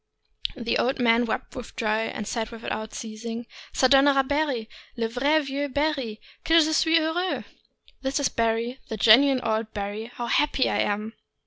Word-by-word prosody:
The 235 -1 -1
old 260 +2 +1
man 235 -1 +3
wept - - -4
with 245 - -8
joy, 220 0 0
and 215 - -5
said, 225 -2 -2
without 220 -1 -6
ceasing: 230 +1 -6 0.3
"(Jo, - - +2
donnera 275 0 +5
Barry, 285 -6 0 0.3
le 230 -1 0
vrai 280 +7 +2
meux 280 +1 -2
Barry; 275 -6 -1 0.2
gue 330 +1 +5
je 315 0 +2
suis 320 +1 +4
heureux! 330 +3 -1 0.3
" - - -31
(This 270 +2 -1
is 280 - +2
Barry, 230 +2 -1
the 220 - -4
genuine 255 +5 +6
old 220 -1 -1
Barry; 205 +2 -4
how 240 - -5
happy 270 +2 +2
I - - 0
am!). 210 +2 -1
240 Hz, 175 wpm, -25 LUFS, 225-285 Hz, 0.3 s, genuine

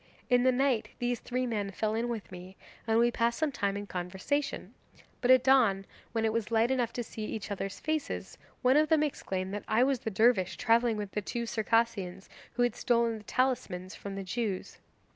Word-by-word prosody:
In 245 0 +5
the 255 +1 +4
night 255 -2 +1
these 245 -1 -1
three 255 +1 -2
men 210 -4 -2
fell 215 +2 -1
in 230 +2 -1
with 225 -5 -5
me, 185 +1 -10 0.3
and 225 0 +3
we 240 +1 +4
passed 235 0 +1
some 315 -2 0
time 200 -6 -1
in 205 - -5
conversation, 190 +11 -3 0.5
but 245 - 0
at 255 -1 +7
dawn, 230 -8 +4 0.3
when 225 -1 0
it 220 - +1
was 230 -1 -1
light 230 +2 +2
enough 245 -3 +1
to 240 - -3
see 220 -1 -7
each 215 -1 -5
other's 195 -1 -4
faces, 310 -1 -3 0.2
one 255 +3 +5
of 305 0 +3
them 315 -1 +4
exclaimed 190 -10 -3
that 205 - -4
I 225 +3 +3
was 270 -1 +2
the 220 - -3
dervish 190 -4 +2
travelling 230 -1 +3
with 205 -2 -4
the 210 - -2
two 235 +4 -3
Circassians 220 -5 0 0.2
who 245 +1 +1
had 245 - +1
stolen 235 -2 +1
the - - -15
talismans 200 -8 -1
from 200 -1 -7
the 195 - -4
Jews. 195 0 -3
230 Hz, 205 wpm, -30 LUFS, 200-245 Hz, 0.5 s, at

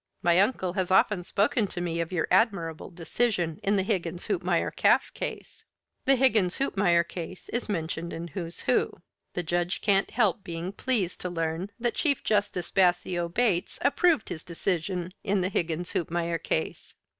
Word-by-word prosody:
My 175 +1 +4
uncle 195 -4 +1
has 185 -2 -1
often 190 0 +3
spoken 205 +4 +1
to 180 - -6
me 170 -1 -2
of 165 +1 -4
your 175 -3 0
admirable 180 -5 +1
decision 175 -1 -1
in 200 +1 +1
the 190 - +2
Higgins 180 -4 -2
Hoopmeyer 365 - 0
calf - - +3
case." - - -6 0.4
The 270 - +5
Higgins 225 -9 +3
Hoopmeyer 175 -10 +2
case 175 +1 -7
is 240 -1 -3
mentioned 170 -2 -3
in 170 +1 -5
"Who's 170 +1 -5
Who." - - +1 0.4
The 180 - -1
Judge 175 +2 -1
can't 195 -2 +2
help 210 -5 +1
being 170 +1 -4
pleased 200 -4 -2
to 180 - -3
learn 165 +2 -2
that 240 0 0
Chief 285 -5 0
Justice 205 -4 0
Bassio 175 -2 +2
Bates 195 -2 0
approved 305 0 +3
of - - +1
his 160 - -8
decision 180 +1 -2
in 200 -2 +1
the 185 - 0
Higgins 170 -2 -1
Hoopmeyer 170 0 -1
case. 160 - -3
180 Hz, 170 wpm, -27 LUFS, 170-205 Hz, 0.4 s, The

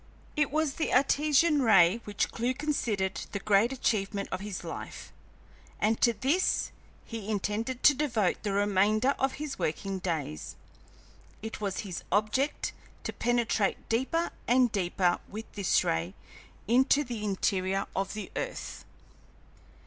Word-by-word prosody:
It 300 -2 +2
was 310 -1 0
the 315 - -2
Artesian 295 +3 +4
ray 210 -2 +5
which 205 -1 -1
Clewe 245 +3 -1
considered 235 -10 -1
the 200 - -1
great 210 +4 +3
achievement 205 -6 -1
of 185 - -2
his 200 -1 -6
life, - - -7 0.7
and 220 +1 +1
to 235 - +5
this 275 - +1 0.3
he 220 -3 -6
intended 220 +4 -2
to 295 - +8
devote 240 -10 0
the 205 - -2
remainder 205 +5 +3
of 270 0 +1
his 300 -1 -5
working 190 +5 -2
days. 155 - -3 0.9
It 220 -1 -6
was 195 -3 -2
his 185 -5 -6
object 215 +9 0 0.3
to - - -4
penetrate 235 -4 0
deeper 265 +9 0 0.2
and 245 -1 +4
deeper 180 -2 +1
with 220 +3 -6
this 200 -3 +2
ray 80 +3 -1 0.5
into 265 +5 +4
the 235 -5 -5
interior 195 -1 0
of 195 +1 -2
the 215 - -6
earth. - - -5
215 Hz, 135 wpm, -29 LUFS, 195-260 Hz, 0.9 s, to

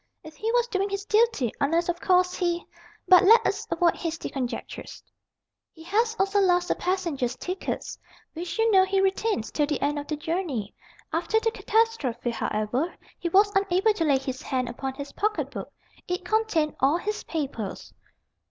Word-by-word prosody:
If 315 -1 -11
he 440 +7 -2
was 485 -1 +3
doing 395 -2 -1
his 395 0 -4
duty 425 - +2
unless, 330 +4 +2
of 345 0 -2
course, 360 -1 +3
he 345 -2 -1 0.4
but 365 0 +8
let 450 +4 +7
us - - -1
avoid 345 -2 +2
hasty 330 -1 -4
conjectures." 255 -3 -5 0.7
"He 320 - -13
has 445 +6 +1
also 390 +1 +2
lost 355 -2 +3
the - - +4
passengers' 335 -10 -1
tickets, 365 +6 -4 0.3
which 340 +4 -5
you 450 0 +3
know 380 -2 +6
he 385 +1 +1
retains 390 - 0
till 295 -1 +1
the 295 -2 -1
end 290 +1 0
of 290 - -7
the 305 - -2
journey. 300 - -3 0.4
After 350 +7 +1
the 455 0 0
catastrophe, 435 - 0
however, 230 +8 -1 0.3
he 345 - -2
was 405 +3 +4
unable 390 +2 +3
to 360 - -1
lay 280 -3 +4
his 260 -1 -5
hand 255 -2 -2
upon 265 +2 -5
his 280 0 -7
pocket 425 +1 -1
book. - - -7 0.4
It 360 +1 -3
contained 400 -8 +1
all 280 +5 +3
his 420 +4 -3
papers." 275 - -4
350 Hz, 175 wpm, -26 LUFS, 285-395 Hz, 0.7 s, but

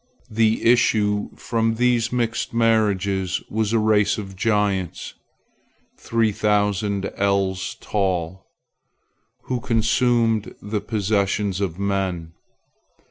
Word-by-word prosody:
The 110 0 +2
issue 105 -3 +2
from 115 -1 -1
these 120 -1 +1
mixed 120 -1 -2
marriages 100 -5 +1
was 110 -1 0
a 115 - +2
race 110 -2 +2
of 95 -3 -7
giants, 100 -4 -1 0.9
three 115 -2 +1
thousand 100 -1 0
ells 95 -2 0
tall, 95 -2 -2 1.0
who 125 -1 -2
consumed 115 -1 +1
the 105 0 -3
possessions 100 -2 -1
of 90 -4 -2
men. 95 -4 -2
105 Hz, 95 wpm, -22 LUFS, 95-115 Hz, 1.0 s, The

